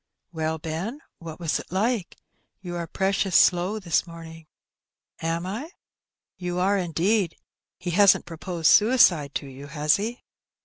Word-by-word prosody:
"Well, 160 -1 -2
Ben, 165 - -5 0.2
what 165 -1 -9
was 165 -3 -1
it - - -11
like? 205 0 -1 0.4
You 175 -2 -6
are 170 -1 -4
precious 195 0 0
slow 180 +4 +4
this 175 -4 0
morning." 165 -1 -11 0.7
"Am 165 +1 -2
I?" 225 - -5 0.7
"You 180 -1 -4
are, 190 +3 +2
indeed. 180 +2 0 0.4
He 175 - -4
hasn't 200 +2 +5
proposed 170 0 0
suicide 190 - +4
to - - -2
you, 135 +1 -10
has 150 +1 +2
he?" 225 +5 -5
175 Hz, 140 wpm, -25 LUFS, 165-195 Hz, 0.7 s, hasn't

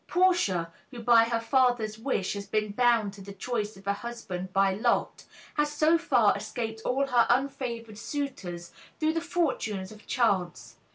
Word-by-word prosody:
Portia, 350 - +2 0.2
who 245 - -9
by 230 0 +5
her 230 0 0
father's 230 -3 +1
wish 225 -6 -1
has 200 -1 -6
been 215 -1 -1
bound 230 -2 +2
to 200 - -12
the 200 +1 -9
choice 210 0 -3
of 195 - -16
a 200 - +1
husband 200 -5 -6
by 195 0 +3
lot, 205 - 0 0.3
has 295 0 +1
so 310 +2 +3
far 335 - +3
escaped 225 -2 -5
all 270 +2 +1
her 245 -4 +3
unfavored 245 -4 -1
suitors 190 - -5 0.3
through 315 0 +2
the 330 - -1
fortunes 255 - -1
of 215 -1 -15
chance. 195 - 0
230 Hz, 165 wpm, -28 LUFS, 200-270 Hz, 0.3 s, by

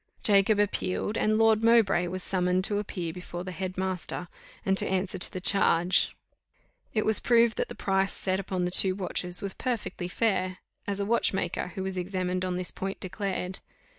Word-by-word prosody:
Jacob 205 0 +5
appealed, 205 0 -1
and 215 -1 +2
Lord 220 -1 +4
Mowbray 225 -6 +4
was 185 +1 -4
summoned 180 0 +1
to 205 +1 +1
appear 180 -5 -4
before 175 0 -7
the 185 - -6
head 185 +2 -5
master, 185 -1 -3 0.4
and 195 - +2
to - - -1
answer 190 0 -1
to - - +4
the 185 - -5
charge. 180 -2 +3 0.8
It 215 - 0
was 220 - +3
proved 235 -2 +4
that - - -1
the - - -7
price 195 0 +1
set 190 0 0
upon 185 -2 -2
the 180 - -2
two 185 0 +4
watches 180 -2 -1
was 195 -1 -2
perfectly 230 -7 -3
fair, 185 -2 0 0.3
as 200 0 -2
a 200 - 0
watchmaker, 200 -4 0
who 190 - -3
was 190 -1 -3
examined 185 0 -2
on 180 -1 -2
this 180 -1 -2
point, 195 +1 -5
declared. 190 -1 -3
190 Hz, 185 wpm, -28 LUFS, 180-205 Hz, 0.8 s, Jacob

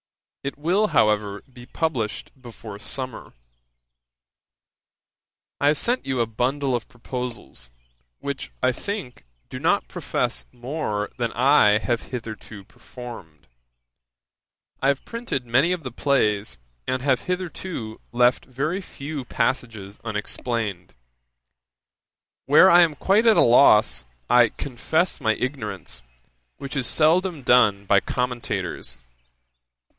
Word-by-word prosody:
It 140 - -4
will, 180 +8 +2
however, 105 - +1
be 120 0 -12
published 130 -9 -2
before 115 -4 -10
summer. 130 +3 -6 2.3
'I 140 - +2
have 150 +1 +4
sent 245 - 0
you 130 -2 -1
a 115 - +3
bundle 130 +4 -1
of 120 - -4
proposals, 120 - -6 0.5
which, 140 -1 -5
I 130 - +4
think, 130 - -6 0.3
do - - -5
not - - +1
profess - - -2
more 120 -5 -3
than 120 -1 0
I 125 -5 +5
have 120 +1 -2
hitherto 110 -4 -7
performed. 95 - -11 1.4
I 135 - +2
have 140 -1 +1
printed 230 - -4
many 130 +9 +3
of 180 -3 -2
the 130 - -5
plays, 105 - 0 0.3
and 130 0 -1
have 135 -3 +1
hitherto 180 -10 -4
left 120 +1 +3
very 150 +9 -2
few 145 -5 -6
passages 115 -5 -2
unexplained; 105 - -3 1.5
where 155 +7 +7
I 175 +1 +8
am 165 -3 +3
quite 205 +9 +3
at 220 - +6
a - - +7
loss, 110 - +5 0.2
I 120 -2 +6
confess 150 - -1
my 110 -3 +2
ignorance, 105 - -4 0.6
which 140 +1 -7
is 135 -3 0
seldom 165 0 +2
done 110 -5 +4
by 100 +1 +5
commentators. 115 - -3
125 Hz, 120 wpm, -24 LUFS, 110-145 Hz, 2.3 s, I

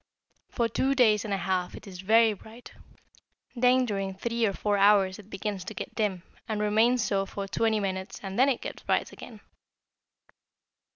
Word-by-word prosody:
For 235 -2 0
two 270 +4 0
days 215 -5 +4
and 210 - -5
a 195 - +1
half 180 -1 -2
it - - -11
is 185 -3 -9
very 220 +3 +4
bright, 220 +4 -13 0.8
then 250 +1 +4
during 195 -4 -3
three 230 +3 -1
or 200 - -1
four 205 +1 0
hours 195 -1 +4
it 205 0 -14
begins 195 -1 -4
to - - -7
get - - -6
dim, 195 -5 -1 0.2
and 215 -2 -2
remains 220 +3 +3
so 195 -1 0
for 200 0 -5
twenty 220 +2 +1
minutes 190 -1 -4
and 195 +3 -4
then 265 +2 +5
it 260 - -1
gets - - -7
bright - - 0
again. 220 -4 -12
210 Hz, 180 wpm, -27 LUFS, 195-230 Hz, 0.8 s, then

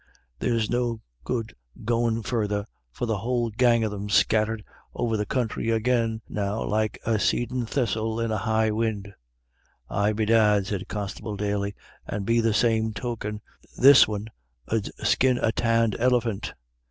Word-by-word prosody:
There's 115 -3 0
no 120 -2 -1 0.2
good 115 -3 -3 0.3
goin' 115 -1 +1
further, 105 -3 -1 0.3
for 120 - -3
the 110 -4 -1
whole 120 +1 -1
gang 120 0 +3
of 110 - -1
them's 100 0 -2
scattered 110 +1 +2 0.3
over 115 -2 0
the 105 -1 -2
counthry 115 -2 -1
agin 115 -1 0
now 105 +1 -2
like 110 0 -1
a 110 -2 +1
seedin' 120 +2 0
thistle 110 -3 -1
in 115 -1 -1
a 110 - 0
high 110 0 +1
win'." 105 -2 -2 0.8
"Aye, 105 +1 +1
bedad," 105 -2 +3
said 100 0 -4
Constable 105 0 -5
Daly, 100 0 -2 0.3
"and 100 -1 -3
be 115 +2 +3
the 115 -1 +2
same 110 0 +2
token, 105 -1 -4 0.4
this 135 +1 +8
win' 105 +1 -4 0.4
ud 110 -2 -1
skin 130 -1 +3
a 115 - +1
tanned 115 -2 +1
elephant. 115 -3 0
110 Hz, 150 wpm, -25 LUFS, 105-115 Hz, 0.8 s, this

